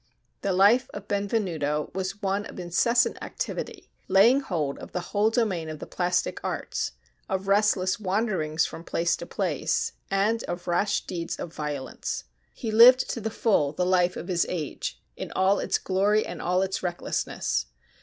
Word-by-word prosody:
The 200 - 0
life 205 +8 +4
of 205 -1 -7
Benvenuto 180 -8 -1
was 190 +3 -4
one 200 +1 0
of - - -10
incessant 235 +8 +2
activity, - - -5 0.2
laying 210 +8 +6
hold 160 - -2
of - - -10
the - - -1
whole 210 +1 +4
domain 205 -9 0
of 155 - -5
the - - -7
plastic 180 0 -1
arts: - - -3 0.4
of 190 0 -2
restless 200 -1 +2
wanderings 185 -6 0
from 165 - -7
place 170 0 0
to - - -8
place; - - -1 0.2
and 210 +4 +1
of 175 0 -5
rash 195 +4 +1
deeds 170 -2 -4
of 165 - -7
violence. 150 -4 -4 0.3
He 225 - -4
lived 245 +4 +7
to 230 - -4
the 220 - -2
full 195 -10 +1
the 180 +3 0
life 180 0 +2
of - - -6
his 180 -3 +2
age, 160 -5 -4 0.2
in - - -6
all 190 +2 +3
its - - +1
glory 200 +3 +2
and - - -6
all 180 +1 +1
its 190 0 -2
recklessness. 175 - -2
190 Hz, 165 wpm, -26 LUFS, 175-210 Hz, 0.4 s, lived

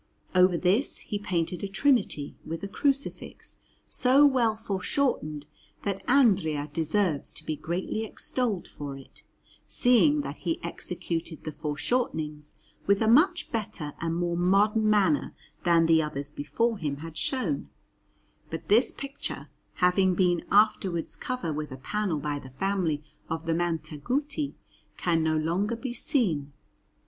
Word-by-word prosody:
Over 180 -1 +5
this 190 - +1
he 205 - -4
painted 180 -3 -2
a - - -1
Trinity, 195 - +1
with 165 +4 -6
a - - -2
Crucifix 275 +7 -2 0.3
so 265 +3 +5
well 245 -6 +3
foreshortened 195 - -1 0.4
that 195 -1 -2
Andrea 185 - +3
deserves 165 -1 0
to - - -6
be 155 - -2
greatly 180 +8 -3
extolled 225 -2 -2
for 140 -2 -7
it, 135 - -12 0.5
seeing 270 +5 +4
that - - -6
he 170 -2 -2
executed 170 -1 -4
the 155 - -4
foreshortenings 150 - -2 0.3
with 200 0 +4
a 220 - +2
much 335 - +4
better 195 -9 -3
and 165 0 -1
more 175 0 0
modern 205 +5 +3
manner 215 +8 +2 0.3
than 170 -1 +5
the 165 -1 +5
others 145 -2 -4
before 225 +10 -1
him 145 -3 -2
had 165 -1 -9
shown; 195 - -2 0.8
but 160 - -6
this 225 +5 +5
picture, 275 0 -7 0.3
having 180 0 +3
been 175 -2 +2
afterwards 200 -5 +2
covered 250 -11 -3
with 150 -1 -4
a 130 - -6
panel 195 +5 -1
by 145 0 -2
the 130 - -11
family 165 0 -1 0.3
of 160 +1 -3
the 165 - +1
Montaguti, 175 - -2 0.4
can 165 -2 +1
no 160 0 +1
longer 180 +9 0
be 240 +1 -5
seen. 160 - 0
180 Hz, 140 wpm, -27 LUFS, 160-220 Hz, 0.8 s, Over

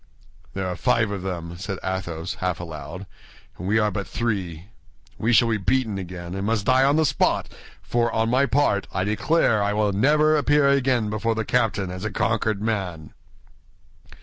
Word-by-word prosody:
"There 95 -1 -2
are 90 - -3
five 110 +2 +1
of 100 -2 -4
them," 85 -2 -5
said 100 0 -4
Athos, 90 -3 -4
half 90 -2 -1
aloud, 85 +3 -7 0.5
"and 90 - -5
we 110 +3 +2
are 105 -1 +2
but 100 +1 -4
three; 95 -6 -3 0.5
we 115 - +1
shall 120 0 +5
be 115 - +1
beaten 110 0 0
again, 90 -1 -7
and 95 0 -3
must 110 -3 0
die 130 +1 +4
on 140 +2 +4
the 160 0 +3
spot, - - +1 0.4
for, 120 0 0
on 115 0 +1
my 130 +4 +2
part, 135 -9 +1
I 95 - -1
declare 110 +2 +2
I 100 0 0
will 105 -1 +1
never 150 +8 +3
appear 145 -1 +3
again 130 -5 +2
before 115 +1 -1
the 110 -1 -2
captain 105 -6 0
as 90 +1 -7
a 110 - -1
conquered 110 -3 0
man." 95 -8 -3
105 Hz, 180 wpm, -23 LUFS, 95-120 Hz, 0.5 s, shall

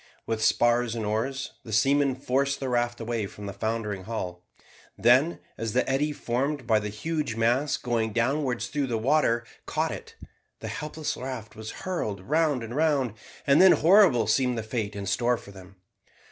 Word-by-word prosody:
With 110 -1 -2
spars 120 0 +3
and 110 -2 -3
oars, 130 +6 -2
the 115 - -9
seamen 135 +5 +3
forced 140 +1 0
the 135 - -3
raft 120 -1 0
away 115 -2 -2
from 105 +1 -10
the 100 - -5
foundering 105 -3 -3
hull. 90 -6 -5 0.5
Then, 130 +8 +4 0.2
as 115 -2 -3
the 125 - +1
eddy 140 +3 +1
formed 135 +1 -2
by 110 -2 +3
the 105 0 -4
huge 145 +3 -3
mass 120 +6 +1
going 115 -2 -1
downwards 125 +2 0
through 145 -2 -2
the 115 -3 -1
water 120 -1 +2 0.2
caught - - 0
it, - - -8 0.4
the - - -6
helpless 150 0 -4
raft 130 -4 -6
was 110 0 -8
whirled 110 - -2
round 150 - +1
and 115 +2 -6
round, 145 -7 +1 0.3
and 140 +4 +5
then 190 -1 +8
horrible 170 - +5
seemed 125 +3 +1
the 110 - -2
fate 110 -2 -3
in 100 -1 -5
store 120 +4 +1
for 100 - -13
them. 95 -1 -14
120 Hz, 175 wpm, -27 LUFS, 110-140 Hz, 0.5 s, then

